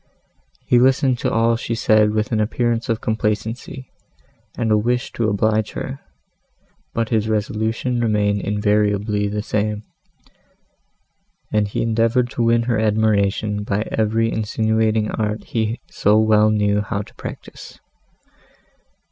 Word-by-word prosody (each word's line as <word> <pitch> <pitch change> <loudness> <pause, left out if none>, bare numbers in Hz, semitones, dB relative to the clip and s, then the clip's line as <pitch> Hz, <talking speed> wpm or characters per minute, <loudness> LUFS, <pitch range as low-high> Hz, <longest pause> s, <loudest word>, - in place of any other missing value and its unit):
He 120 - +4
listened 130 0 +3
to - - -1
all 115 +1 +2
she 115 0 -3
said 110 -1 +3
with 110 +1 -1
an 110 - +1
appearance 115 +2 -1
of 115 -1 0
complacency 110 +4 -3 0.7
and 115 -3 0
of 105 - +5
a - - +1
wish 120 +2 -1
to 115 -2 -1
oblige 110 +1 0
her; 135 +1 -5 0.9
but 115 -1 -2
his 110 -1 0
resolution 110 +3 -1
remained 105 -3 +1
invariably 105 0 0
the 105 +1 -3
same, 105 0 -2 1.7
and 105 -1 +2
he 100 - -2
endeavoured 115 +2 +1
to - - -3
win 115 0 +3
her 115 -2 0
admiration 105 -1 +1
by 105 +1 -2
every 115 +1 +1
insinuating 110 0 0
art 105 -1 -2
he 110 0 -2
so 105 +1 +3
well 110 -1 +4
knew 105 -1 +1
how 100 0 -3
to - - -18
practise. - - -10
110 Hz, 135 wpm, -20 LUFS, 105-115 Hz, 1.7 s, of